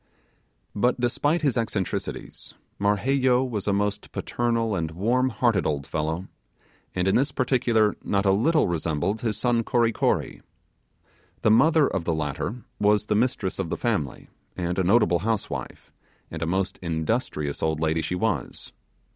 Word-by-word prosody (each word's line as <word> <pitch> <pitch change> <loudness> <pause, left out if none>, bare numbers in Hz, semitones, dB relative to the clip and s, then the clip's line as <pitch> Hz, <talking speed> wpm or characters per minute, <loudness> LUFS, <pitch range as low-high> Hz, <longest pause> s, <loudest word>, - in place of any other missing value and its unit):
But 120 +4 +1
despite 145 +7 +1
his 140 -5 +2
eccentricities, 110 -5 -3 0.2
Marheyo 125 +5 +2
was 105 -5 -4
a - - +3
most 100 +1 -1
paternal 115 -2 -1
and 80 -3 -1
warm 120 +10 +1
hearted 115 -4 +1
old 70 -2 -2
fellow, 80 +4 -2 0.7
and 90 0 0
in 95 - +3
this 135 +3 +2
particular 120 -5 +2
not 100 0 0
a 95 - +5
little 150 +11 +3
resembled 85 +4 -1
his 110 -4 -1
son 120 -2 +1
Kory 120 -1 +2
Kory. - - -1 1.0
The 110 - +5
mother 155 +6 +5
of 95 -9 -2
the 80 - 0
latter 80 - -3 0.2
was 105 0 +3
the - - 0
mistress 110 -5 0
of 95 -4 -2
the - - -2
family, 100 - -2 0.3
and 90 0 -1
a - - +2
notable 90 -3 +4
housewife, 110 +3 -4 0.4
and 80 - -6
a 85 - -1
most 95 +2 -1
industrious 80 - -2
old 80 -1 0
lady 80 +1 +1
she 85 +3 -2
was. 90 - -2
105 Hz, 155 wpm, -25 LUFS, 85-120 Hz, 1.0 s, a